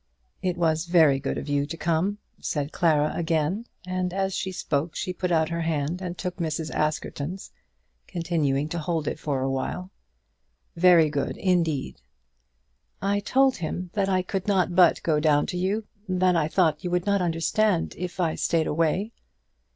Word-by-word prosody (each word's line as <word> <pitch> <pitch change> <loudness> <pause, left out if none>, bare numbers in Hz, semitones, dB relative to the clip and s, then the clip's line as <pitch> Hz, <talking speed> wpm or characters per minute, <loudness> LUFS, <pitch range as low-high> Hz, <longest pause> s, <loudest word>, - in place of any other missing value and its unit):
"It 180 -1 -1
was 160 -1 +1
very 160 -6 +5
good 135 - -3
of - - -5
you 145 0 0
to 165 +2 -6
come," 170 +5 0 0.2
said 145 0 -2
Clara 155 -4 +2
again, 170 +6 0 0.2
and 185 0 -2
as 195 0 0
she 190 - -2
spoke 160 -2 -2
she 185 - -3
put 180 0 -2
out 160 -2 +2
her 170 0 -2
hand 160 +2 -1
and 180 -1 -5
took 180 +1 -4
Mrs. 160 -2 -2
Askerton's, 155 +3 -3 0.6
continuing 155 -5 0
to 170 - -3
hold 165 -2 -2
it - - -2
for 140 -3 -2
awhile; 135 +8 -2 0.8
"very 170 -3 +5
good 145 -2 -2
indeed." 165 - 0 1.0
"I 200 +1 +1
told 265 +5 +2
him 175 +1 -4
that 195 -2 0
I 185 -1 +2
could 190 +1 -3
not 185 -3 +2
but 180 -3 +5
go 155 -2 +2
down 150 -1 +3
to 180 - -4
you, 200 +4 -1 0.2
that 185 -1 +3
I 155 -3 +2
thought 160 -3 +1
you 180 - -2
would 180 0 0
not 200 -1 +2
understand 175 +3 +1
it - - -16
if 180 +1 -5
I 165 -3 +1
stayed 165 -2 +1
away." 165 +7 0
170 Hz, 175 wpm, -26 LUFS, 155-185 Hz, 1.0 s, very